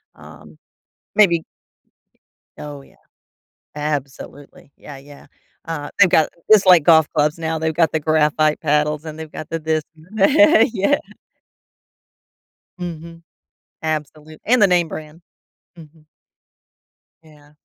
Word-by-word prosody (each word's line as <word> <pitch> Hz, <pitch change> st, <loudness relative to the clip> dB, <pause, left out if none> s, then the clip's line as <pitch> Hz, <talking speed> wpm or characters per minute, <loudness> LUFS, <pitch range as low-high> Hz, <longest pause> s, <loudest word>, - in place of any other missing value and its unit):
Um, -, -, -16 dB, 0.6 s
maybe 170 Hz, -6 st, +4 dB, 1.2 s
Oh, 145 Hz, -2 st, -9 dB
yeah. -, -, -22 dB, 0.8 s
Absolutely, 145 Hz, -1 st, -7 dB
yeah, 145 Hz, -, -12 dB
yeah. 140 Hz, +1 st, -16 dB, 0.4 s
Uh, 155 Hz, -3 st, -6 dB
they've 185 Hz, -3 st, +6 dB
got 160 Hz, -, +3 dB, 0.2 s
just 205 Hz, -2 st, +6 dB
like 180 Hz, -4 st, +6 dB
golf 160 Hz, -1 st, +5 dB
clubs 150 Hz, 0 st, 0 dB
now, 160 Hz, -1 st, -3 dB
they've 160 Hz, 0 st, -2 dB
got 160 Hz, -1 st, +1 dB
the 160 Hz, -, -1 dB
graphite 155 Hz, 0 st, +1 dB
paddles, 150 Hz, 0 st, 0 dB
and 155 Hz, 0 st, -8 dB
they've 160 Hz, -1 st, -9 dB
got 155 Hz, -, -8 dB
the 165 Hz, -, -3 dB
this, 155 Hz, 0 st, -2 dB
and 160 Hz, +2 st, -20 dB
the 195 Hz, -, +5 dB
yeah, 310 Hz, +3 st, +5 dB, 0.3 s
yeah. 290 Hz, -, +3 dB, 1.8 s
Mhm, 170 Hz, -1 st, -8 dB, 0.6 s
absolute 155 Hz, 0 st, -6 dB
and 245 Hz, +1 st, +2 dB
the 205 Hz, -, +6 dB
name-brand. 165 Hz, -2 st, -2 dB, 0.6 s
Mhm. 155 Hz, -1 st, -17 dB, 1.2 s
Yeah. 150 Hz, -2 st, -21 dB
155 Hz, 120 wpm, -19 LUFS, 150-165 Hz, 1.8 s, they've